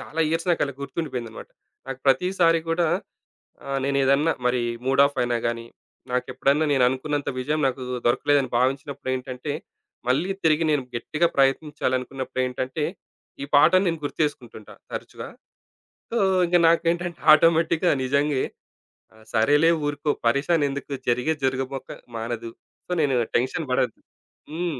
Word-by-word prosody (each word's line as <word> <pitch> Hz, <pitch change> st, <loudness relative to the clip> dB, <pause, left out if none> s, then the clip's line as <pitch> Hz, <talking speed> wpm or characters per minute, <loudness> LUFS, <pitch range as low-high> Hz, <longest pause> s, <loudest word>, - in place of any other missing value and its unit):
చాలా 160 Hz, -, -5 dB
ఇయర్స్ 165 Hz, +2 st, -1 dB
నాకు 170 Hz, -, +1 dB
అలా 140 Hz, -2 st, -6 dB
గుర్తుండిపోయిందన్నమాట. 130 Hz, -5 st, -5 dB, 0.4 s
నాకు 135 Hz, -1 st, -5 dB
ప్రతిసారి 165 Hz, +4 st, +3 dB
గూడా, 165 Hz, 0 st, +1 dB, 0.8 s
ఆహ్, 135 Hz, 0 st, -2 dB
నేనేదన్నా 140 Hz, +3 st, +2 dB
మరి 125 Hz, 0 st, +2 dB, 0.2 s
మూడ్ 135 Hz, +1 st, +4 dB
ఆఫ్ 140 Hz, -1 st, -3 dB
అయినాగాని, 120 Hz, -1 st, -1 dB, 0.5 s
నాకెప్పుడన్నా 130 Hz, +4 st, +1 dB
నేననుకున్నంత 135 Hz, +2 st, +1 dB
విజయం 150 Hz, +4 st, -1 dB
నాకు 130 Hz, 0 st, -3 dB, 0.2 s
దొరకలేదని 135 Hz, +2 st, +2 dB
భావించినప్పుడేంటంటే, 130 Hz, +1 st, -2 dB, 0.6 s
మళ్ళీ 155 Hz, +9 st, +1 dB
తిరిగి 160 Hz, 0 st, +3 dB
నేను 145 Hz, -3 st, +1 dB
గెట్టిగా 155 Hz, +8 st, 0 dB
ప్రయత్నించాలనుకున్నప్పుడేంటంటే, 130 Hz, -1 st, -1 dB, 0.6 s
ఈ -, -, -3 dB
పాటను 170 Hz, +6 st, +6 dB
నేను 165 Hz, -2 st, -1 dB
గుర్తు 145 Hz, -, -5 dB
చేసుకుంటుంటా 120 Hz, -7 st, -6 dB, 0.2 s
తరచుగా. -, -, -7 dB, 0.8 s
సో, 235 Hz, -, -1 dB, 0.3 s
ఇంగ 175 Hz, +1 st, +4 dB
నాకేంటంటే 170 Hz, +1 st, 0 dB
ఆటోమేటిక్‌గా 165 Hz, +2 st, +3 dB
నిజంగే. 140 Hz, +1 st, +1 dB, 0.7 s
ఆహ్, 110 Hz, 0 st, -19 dB
సరేలే 145 Hz, +9 st, +4 dB
ఊరుకో 145 Hz, 0 st, -1 dB, 0.2 s
పరేషాన్ 145 Hz, +6 st, +2 dB
ఎందుకు? 140 Hz, 0 st, -5 dB, 0.2 s
జరిగేది 130 Hz, +6 st, 0 dB
జరగబోక 130 Hz, 0 st, -3 dB, 0.3 s
మానదు. 115 Hz, 0 st, -4 dB, 0.4 s
సో, -, -, -9 dB
నేను 140 Hz, -3 st, +2 dB, 0.2 s
టెన్షన్ 130 Hz, +5 st, -2 dB
పడొద్దు. 125 Hz, -2 st, 0 dB, 0.5 s
హ్మ్. 165 Hz, -4 st, -3 dB
140 Hz, 120 wpm, -24 LUFS, 130-155 Hz, 0.8 s, పాటను